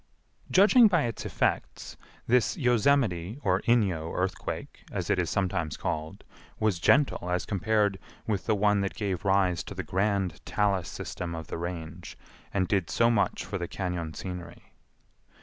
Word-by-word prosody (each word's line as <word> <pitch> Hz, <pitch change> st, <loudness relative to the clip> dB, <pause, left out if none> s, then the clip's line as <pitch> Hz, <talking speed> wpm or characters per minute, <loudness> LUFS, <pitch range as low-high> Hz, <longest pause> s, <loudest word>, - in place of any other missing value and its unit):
Judging 220 Hz, +5 st, +7 dB
by 170 Hz, -7 st, +2 dB
its 115 Hz, -3 st, -3 dB
effects, -, -, -2 dB, 0.3 s
this 125 Hz, 0 st, +2 dB
Yosemite, 120 Hz, -, +2 dB
or 95 Hz, 0 st, +2 dB
Inyo 95 Hz, -9 st, +1 dB
earthquake, -, -, -4 dB
as -, -, -2 dB
it -, -, +2 dB
is -, -, 0 dB
sometimes 90 Hz, -5 st, -1 dB
called, 80 Hz, 0 st, -4 dB, 0.4 s
was 105 Hz, -6 st, +1 dB
gentle 130 Hz, -, +3 dB
as 90 Hz, 0 st, 0 dB
compared 100 Hz, -1 st, +1 dB, 0.3 s
with 105 Hz, -3 st, -2 dB
the 110 Hz, -, +3 dB
one 105 Hz, 0 st, +3 dB
that 95 Hz, -, -2 dB
gave 100 Hz, -5 st, -2 dB
rise 95 Hz, -3 st, +2 dB
to 100 Hz, -, -8 dB
the 95 Hz, -, -3 dB
grand 95 Hz, 0 st, -1 dB
talus 100 Hz, -4 st, 0 dB
system 85 Hz, -2 st, -5 dB
of 80 Hz, -1 st, -6 dB
the -, -, -4 dB
Range 85 Hz, 0 st, -6 dB, 0.3 s
and 95 Hz, -2 st, 0 dB
did 95 Hz, -4 st, 0 dB
so 115 Hz, 0 st, +3 dB
much 105 Hz, -4 st, 0 dB
for 95 Hz, 0 st, -4 dB
the 85 Hz, -, -3 dB
cañon 90 Hz, -4 st, -4 dB
scenery. 90 Hz, -2 st, -8 dB
95 Hz, 155 wpm, -28 LUFS, 90-110 Hz, 0.4 s, Judging